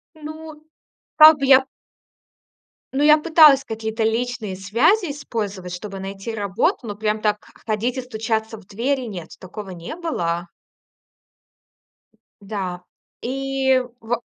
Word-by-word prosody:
Ну, 310 0 -10 0.5
как 310 0 +9
бы 275 - -1
я 265 0 +7 1.3
ну, 275 - 0
я 300 +1 +7
пыталась 305 -4 +6
какие-то 220 0 -4
личные 225 -3 -1
связи 290 - +2
использовать, 205 -10 -5
чтобы 195 +1 -7
найти 195 +3 -6
работу, 200 0 0
но 205 -2 -5
прям 215 0 -1
так 210 -1 0
х - - -20
ходить 230 +4 -1
и - - -2
стучаться 220 -2 -3
в 205 - -16
двери- 255 +7 -1
нет, 165 -2 -9
такого 195 +1 -9
не 175 - -7
было. 175 - -3 1.9
Да, 190 -3 -5 0.4
и 265 +1 +1 0.2
во 235 +1 -2
225 Hz, 125 wpm, -21 LUFS, 200-270 Hz, 1.9 s, как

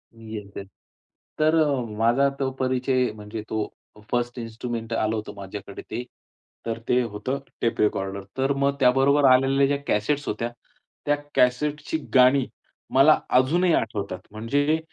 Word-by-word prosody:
मी 110 -1 -9
एक 100 -1 -9
तर 100 - -6 0.7
तर 155 +1 +4
अ, 145 -5 +2 0.2
माझा 120 +5 +3
तो 135 -1 0
परिचय 130 -1 +1
म्हणजे 105 +1 -7
तो 110 -1 -1 0.4
फर्स्ट 120 0 -1
इन्स्ट्रुमेंट 115 0 -5
आलं 110 0 0
होतं 105 -1 -5
माझ्याकडे 100 0 -8
ते. 120 +3 -5 0.6
तर 115 0 -3
ते 125 0 +4
होतं 115 +4 -3 0.2
टेप 115 - 0
रेकॉर्डर. 100 -2 0
तर 135 +1 +2
मग 140 0 +1
त्याबरोबर 135 +2 +4
आलेल्या 135 +2 +4
ज्या 140 0 +1
कॅसेट्स 140 +8 0
होत्या, 115 +3 -2 0.6
त्या 145 0 +3 0.2
कॅसेटची 145 +5 +1 0.2
गाणी 130 +1 +6 0.5
मला 140 +4 +6 0.2
अजूनही 170 +6 +2
आठवतात. 100 -4 -1
म्हणजे 145 +8 0
125 Hz, 140 wpm, -24 LUFS, 110-140 Hz, 0.7 s, गाणी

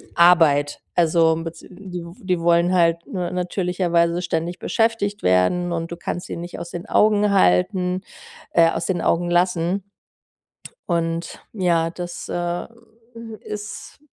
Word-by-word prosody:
Arbeit. 160 -5 +4
Also, 165 -1 +3
bez 165 0 -7
die 180 -2 -9 0.2
die 185 -2 0
wollen 170 +1 +3
halt, 170 -2 +2
ne, 180 -3 -3
natürlicherweise 180 -1 0
ständig 175 0 -3
beschäftigt 225 -3 0
werden 90 - +2
und 165 0 -3
du - - -4
kannst 175 +2 -5
sie - - -5
nicht 175 +1 -7
aus 170 0 -7
den 175 +1 -7
Augen 210 -1 +3
halten 180 - +2 0.5
äh, 165 -1 +5
aus 165 - -3
den 180 -3 -1
Augen 175 +1 +1
lassen. 180 +1 +1 1.1
Und 165 0 -2
ja, 170 -5 +1
das, 175 0 -7
äh, 175 0 -2 0.7
ist 210 0 -8
175 Hz, 130 wpm, -22 LUFS, 170-180 Hz, 1.1 s, äh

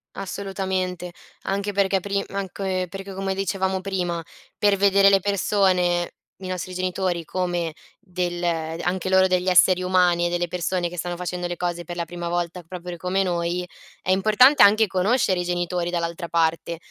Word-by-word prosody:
Assolutamente. 190 -2 -3 0.3
Anche 200 +1 -2
perché 195 -1 +2
prim 200 +1 -2
anche 190 -1 -3
perché 195 +2 -7
come 195 0 -2
dicevamo 190 -1 -1
prima 180 -3 -2 0.4
per 205 -1 +3
vedere 195 0 +5
le 195 - +5
persone 185 -3 +1 0.3
i 190 - -8
nostri 185 0 -4
genitori 185 -1 -1
come 175 -2 -2 0.3
del 180 -3 -3
anche 170 +2 -2
loro 190 0 +5
degli 185 0 0
esseri 185 0 +5
umani 180 -2 +3
e - - -2
delle 175 0 -1
persone 180 0 -1
che 180 - -9
stanno 175 +1 -3
facendo 180 0 -4
le 175 - -4
cose 175 -1 -2
per 175 +1 -7
la 170 -1 -2
prima 175 +1 -6
volta, 175 +1 -2
proprio 175 0 -7
come 185 +3 0
noi, 175 0 -1 0.3
è 185 - -1
importante 215 +9 +5
anche 215 +2 +7
conoscere 190 0 +1
i - - -1
genitori 175 0 -1
dall'altra 170 0 -3
parte, 165 0 0
180 Hz, 165 wpm, -23 LUFS, 175-195 Hz, 0.4 s, anche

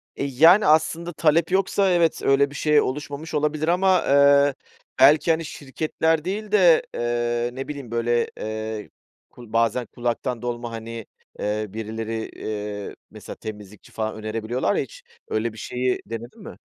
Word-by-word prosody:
E, - - -3
yani 160 +9 +5
aslında 160 +2 +2
talep 165 +3 +2
yoksa, 195 0 +2
evet, 170 -2 +2
öyle 140 +1 +3
bir 145 - -12
şey 150 -1 +3
oluşmamış 145 +4 -5
olabilir 150 +1 0
ama, 185 +1 +3
ııı, 140 0 +5 0.5
belki 150 +4 +6
hani 160 0 0
şirketler 155 +3 -2
değil 210 +2 -4
de, 180 -6 +5
ııı, 120 0 -1
ne 135 - -5
bileyim 140 -6 -7
böyle, 120 0 +1
ııı, 110 0 -5 0.4
kul 120 -3 -14
bazen 115 +1 +1
kulaktan 120 +1 -3
dolma 120 -1 -4
hani, 115 -1 -7 0.3
ııı, 105 -1 -2
birileri, 110 0 -4 0.6
ııı, - - -12 0.2
mesela - - -9
temizlikçi 105 -1 -10
falan 110 -1 -3
önerebiliyorlar 110 - -2
ya - - +1
hiç - - -14 0.2
öyle 110 +1 -2
bir - - -14
şeyi 125 +3 -2
denedin 115 +2 -8
mi? - - -10
130 Hz, 150 wpm, -23 LUFS, 115-155 Hz, 0.6 s, belki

